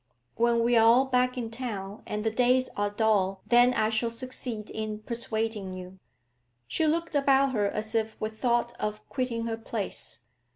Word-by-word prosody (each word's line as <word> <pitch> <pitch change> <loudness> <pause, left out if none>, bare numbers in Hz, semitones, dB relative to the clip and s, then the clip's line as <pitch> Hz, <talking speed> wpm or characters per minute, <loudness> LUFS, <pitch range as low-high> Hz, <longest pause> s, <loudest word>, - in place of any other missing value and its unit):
When 235 0 +2
we 240 +1 +3
are 225 - +6
all 240 +4 +6
back 250 -1 +1
in 230 -2 -3
town 215 -4 -5
and 210 0 -3
the 220 - +1
days 250 +2 +3
are 205 0 -1
dull, 205 -3 +1
then 245 +1 +5
I 215 - +2
shall 225 +1 +1
succeed 230 -2 -5
in 215 -1 -4
persuading 220 -4 -3
you.' 185 +1 -9 0.7
She 315 - +1
looked 335 +1 0
about 275 -1 +4
her 210 -5 +1
as 215 +2 -3
if 220 -1 -1
with 220 0 -4
thought 240 -1 +1
of 210 0 -4
quitting 245 -3 -2
her 225 -1 -2
place. 225 -3 -5
230 Hz, 175 wpm, -28 LUFS, 215-250 Hz, 0.7 s, are